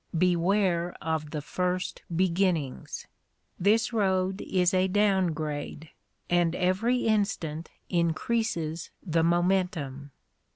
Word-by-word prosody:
Beware 180 0 +2
of 160 -1 -2
the 150 -1 -4
first 180 +3 -2
beginnings! 175 -6 0 0.5
This 215 +5 +3
road 190 -2 +1
is 180 0 +1
a 185 0 +3
down 195 -1 +3
grade, 155 -1 -4 0.4
and 175 -1 +2
every 220 +8 +1
instant 195 -7 0 0.2
increases 170 -1 -1 0.2
the 165 -2 +2
momentum. 170 -5 0
180 Hz, 95 wpm, -28 LUFS, 160-190 Hz, 0.5 s, This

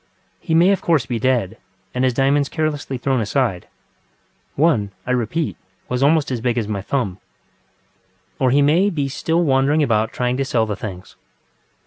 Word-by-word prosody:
He 160 - -1
may 175 +4 +5
of 195 - 0
course 160 -7 +2
be 120 -3 -3
dead, 115 -4 0 0.3
and 125 - -1
his 130 -2 +1
diamonds 140 +2 +2
carelessly 150 -4 -2
thrown 130 0 0
asideŌĆöone, 115 - -3 0.2
I 125 - -2
repeat, 125 +6 -1 0.3
was 125 0 -1
almost 145 0 +3
as 120 -3 -2
big 120 0 0
as 110 -3 -1
my 105 -2 -3
thumb. 100 -4 -2 1.2
Or 130 - +3
he 140 +3 +4
may 170 +8 +3
be 145 -7 -2
still 165 +5 0
wandering 140 +1 +2
about 110 -4 +1
trying 125 0 -1
to 135 - 0
sell 115 -4 +1
the 105 -2 -3
things. 95 -3 -8
130 Hz, 165 wpm, -20 LUFS, 115-145 Hz, 1.2 s, may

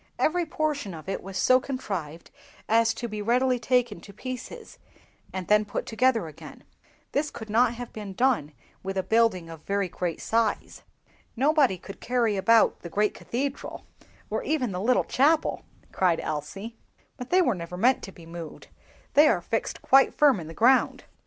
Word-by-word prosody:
Every 345 +1 +1
portion 290 - -2
of 155 +1 -11
it 195 - -3
was 195 0 -7
so 255 +6 +5
contrived 195 - -5 0.4
as 225 +1 +4
to 240 - -4
be 215 -2 -5
readily 250 +3 +2
taken 240 -5 0
to 200 - -12
pieces, 255 - -8 0.5
and 185 -2 -5
then 210 0 +4
put 210 - -4
together 250 -3 +1
again. 155 -2 -11 0.5
This 300 +1 0
could 220 -2 -9
not 240 +2 +3
have 245 0 -8
been 205 -3 -7
done 240 - +1 0.3
with 195 0 -4
a 190 - 0
building 220 -6 +2
of 165 -2 -10
very 200 +1 -1
great 175 -1 -4
size." 225 -1 -1 0.5
"Nobody 275 - +3
could 195 +2 -11
carry 235 -4 +1
about 220 +4 +4
the 170 - -9
great 210 +4 +1
cathedral, 275 +3 -4 0.4
or - - -2
even 270 -8 -1
the 180 0 -4
little 245 +4 +3
chapel!" 305 +4 +1 0.3
cried 180 -3 +2
Elsie; 195 +9 -5 0.4
"but 250 - -8
they 365 0 +4
were 250 - +2
never 180 -1 -7
meant 250 +7 +3
to 195 - -8
be 170 -3 -15
moved, 165 -1 -9 0.4
they 300 +2 +7
are 200 - +3
fixed 225 +6 -3
quite 270 0 +5
firm 285 -8 +4
in 160 - -8
the 165 - -9
ground." 255 +3 +3
225 Hz, 175 wpm, -26 LUFS, 190-255 Hz, 0.5 s, they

